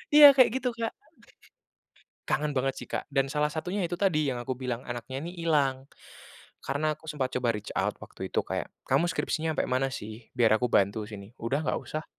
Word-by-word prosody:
Iya 290 -1 +12
kayak 255 -4 +6
gitu, 250 -1 0
Kak. 230 -1 -2 1.4
Kangen 150 0 +1
banget 135 -1 0
sih - - -12
Kak - - -2
dan 135 -1 0
salah 150 0 +2
satunya 175 +6 -3
itu 175 - -3
tadi 165 -6 +2
yang 130 - 0
aku 120 +1 -4
bilang 125 -1 -3
anaknya 120 +4 -5
ini 170 - -5
hilang, 140 -5 +1 0.7
karena 155 +3 0
aku 160 +1 -11
sempat 130 -3 -2
coba 125 -2 +1
reach 105 - -8
out - - 0
waktu - - -8
itu - - -6
kayak, - - -3 0.2
"Kamu 175 +1 +2
skripsinya 160 -3 -1
ampe - - +2
mana 130 +1 +1
sih? 110 -1 -8
Biar 115 -3 +5
aku 125 - +1
bantu 100 +2 +2
sini," 105 +2 -10
"udah 140 +7 -1
nggak - - 0
usah." 155 +1 -5
135 Hz, 195 wpm, -28 LUFS, 125-160 Hz, 1.4 s, Iya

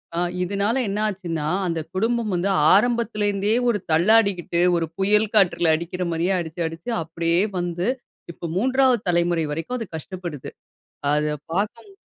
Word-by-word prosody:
அ - - -3 0.3
இதுனால 200 +7 0
என்ன 200 +1 -2
ஆச்சுன்னா, 170 -7 -3 0.2
அந்த 165 -1 -1
குடும்பம் 225 +3 0
வந்து 180 +2 0 0.2
ஆரம்பத்தில 230 0 +2
இருந்தே 205 +2 +1
ஒரு 215 -3 +1
தள்ளாடிக்கிட்டு 180 0 +3 0.2
ஒரு 170 -1 0
புயல் 210 +3 +3
காற்றில 175 -5 +4
அடிக்கிற 170 +3 -4
மாரியே 170 +3 0
அடிச்சு 170 0 -5
அடிச்சு 165 +9 -8
அப்பிடியே 165 +2 0 0.2
வந்து 175 +1 -2 0.4
இப்போ 170 - -9
மூன்றாவது 260 +2 +3
தலைமுறை 170 -1 +2
வரைக்கும் 165 +11 -3
அது 225 - -4
கஷ்டப்படுது. 170 -3 -6 0.6
அத 150 +1 +1 0.2
பாக்கும் 205 - -3
185 Hz, 140 wpm, -23 LUFS, 170-210 Hz, 0.6 s, காற்றில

